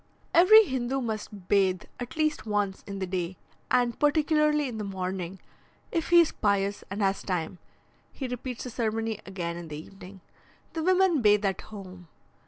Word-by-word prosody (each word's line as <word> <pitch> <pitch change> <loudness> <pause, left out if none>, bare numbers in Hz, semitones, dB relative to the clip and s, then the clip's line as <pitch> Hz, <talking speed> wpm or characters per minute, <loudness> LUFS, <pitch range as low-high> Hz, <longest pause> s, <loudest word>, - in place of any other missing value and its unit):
Every 420 +6 +8
Hindoo 260 - -2
must 215 -5 -5
bathe 190 -3 +2 0.2
at 245 +1 -6
least 310 -6 0
once 205 -2 -1
in 200 -1 -5
the 190 - -2
day, 180 -1 -3 0.3
and 245 -1 +2
particularly 300 0 +3
in 230 -3 -5
the - - -3
morning; 190 -1 -4 0.5
if 330 -2 -1
he 345 0 +8
is 330 - +1
pious 200 -1 0
and 200 +2 -2
has 195 0 +1
time, 180 -1 -3 0.5
he 265 - -5
repeats 250 0 -5
the 250 - -6
ceremony 225 -2 -2
again 170 -3 -4
in 175 -1 -7
the 150 -1 -6
evening. 190 +3 -12 0.5
The 325 - -2
women 365 -3 +3
bathe 210 -1 +4
at 195 -2 -1
home. 185 -4 -11
210 Hz, 170 wpm, -27 LUFS, 190-265 Hz, 0.5 s, Every